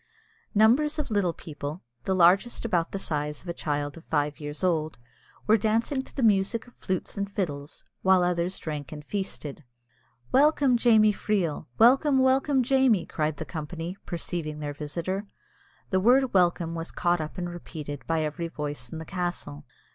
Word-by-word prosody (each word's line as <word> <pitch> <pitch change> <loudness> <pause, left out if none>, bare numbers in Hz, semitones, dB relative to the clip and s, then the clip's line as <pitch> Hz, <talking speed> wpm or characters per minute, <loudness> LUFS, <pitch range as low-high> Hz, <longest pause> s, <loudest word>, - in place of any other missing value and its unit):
Numbers 255 +9 +4
of 300 -6 -3
little 200 -4 +2
people, 155 0 -7 0.2
the 190 - +1
largest 185 +8 +4
about 175 -7 0
the - - -3
size 150 -5 -3
of - - -14
a - - -1
child 145 -3 -2
of 165 - -12
five 145 -2 -1
years 145 +3 -6
old, 160 -4 0 0.5
were 220 +1 +5
dancing 225 +6 +1
to - - -15
the 270 - -1
music 210 +1 +3
of 245 - -18
flutes 190 +2 -4
and 200 0 -2
fiddles, 150 -7 -4 0.2
while 190 -1 +5
others 175 +1 0
drank 150 -4 -5
and 150 -1 -8
feasted. 160 -7 -4 0.7
"Welcome, 280 -2 +4
Jamie 220 -3 +5
Freel! 195 -7 -1
welcome, 270 +4 +5
welcome, 265 +1 +3
Jamie!" 260 -6 +3
cried 155 -1 -2
the - - -5
company, 165 +2 -5
perceiving 165 -3 -3
their 145 -1 -4
visitor. 170 +7 -4 0.6
The 190 - +3
word 250 +6 +4
"Welcome" 175 -3 +2
was 165 0 -4
caught 175 -1 +1
up 155 - -6
and 175 -1 -2
repeated 150 -4 -7
by 160 -1 +1
every 155 +3 -3
voice 145 -6 -5
in 160 - -7
the 160 - -7
castle. 175 - -4
175 Hz, 170 wpm, -27 LUFS, 155-215 Hz, 0.7 s, were